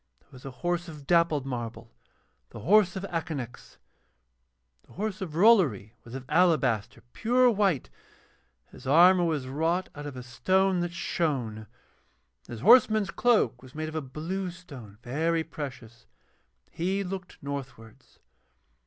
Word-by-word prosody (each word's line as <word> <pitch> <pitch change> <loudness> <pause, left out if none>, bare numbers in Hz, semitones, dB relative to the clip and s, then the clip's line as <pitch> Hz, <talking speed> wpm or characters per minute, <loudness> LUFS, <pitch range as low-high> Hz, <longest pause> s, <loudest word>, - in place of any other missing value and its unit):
There - - -34
was 130 -1 -14
a - - -5 0.2
horse 175 0 0
of 150 -4 -10
dappled 170 -4 +2
marble, 120 - -6 0.6
the - - -10
horse 190 - +4
of 190 - -5
Akanax. 160 -9 -5 1.1
The - - -18
horse 205 0 -4
of 165 -5 -5
Rollory 165 - +4
was 120 +2 -10
of 135 -1 -7
alabaster, 150 - +2
pure 245 +2 +3
white, 195 - 0 0.8
his - - -12
armour 175 +5 +6
was 155 -5 -1
wrought 160 +7 -1
out 145 0 -7
of 135 -3 -8
a 125 - -7
stone 185 +9 +1
that 175 0 -2
shone, 150 -9 -2
and 65 - -36
his 115 -2 -8
horseman's 220 - +5
cloak 240 -2 +2
was 130 +1 -15
made 155 0 -3
of 155 - -9
a 155 - -1
blue 165 +8 -4
stone, 140 - -12
very 160 +6 0
precious. 130 -7 -9 0.6
He 190 +4 -1
looked 185 -1 -7
northwards. 135 -6 -8
160 Hz, 145 wpm, -27 LUFS, 130-185 Hz, 1.1 s, armour